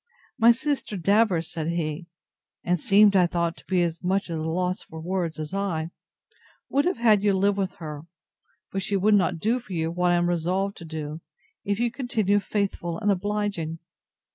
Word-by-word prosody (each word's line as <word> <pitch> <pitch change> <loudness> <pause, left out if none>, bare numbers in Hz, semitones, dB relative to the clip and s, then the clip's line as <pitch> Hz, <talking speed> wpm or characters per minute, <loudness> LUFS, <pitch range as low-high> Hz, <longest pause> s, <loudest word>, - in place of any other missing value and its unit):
My 230 +1 +8
sister 260 -4 -2
Davers, 195 -2 +2
said 160 -1 -3
he, 170 0 -2 0.6
(and 180 0 +1
seemed, 200 +3 +5
I 180 -2 +5
thought, 170 -1 -1
to - - -17
be 185 -2 +2
as 170 0 -3
much 185 0 0
at 165 - -2
a - - -3
loss 180 +3 -1
for 160 - -10
words 170 -1 -2
as 155 +1 -6
I,) 175 -5 -2 0.8
would 280 +1 +2
have 360 - +1
had 220 -4 +4
you 205 -1 +3
live 200 +1 +2
with 190 -2 -2
her; 155 -1 -8 0.6
but 195 - -2
she 200 +1 0
would 210 +3 +3
not 190 -3 +3
do 225 +9 +1
for 230 -6 -10
you 165 -1 -1
what 180 +1 +1
I - - +4
am 175 0 +2
resolved 180 +4 0
to 170 - -9
do, 155 0 -6 0.4
if 200 +1 -1
you 240 0 +1
continue 220 -6 +1
faithful 195 -5 -2
and 210 -1 +1
obliging. 200 -4 -2
185 Hz, 190 wpm, -25 LUFS, 165-205 Hz, 0.8 s, My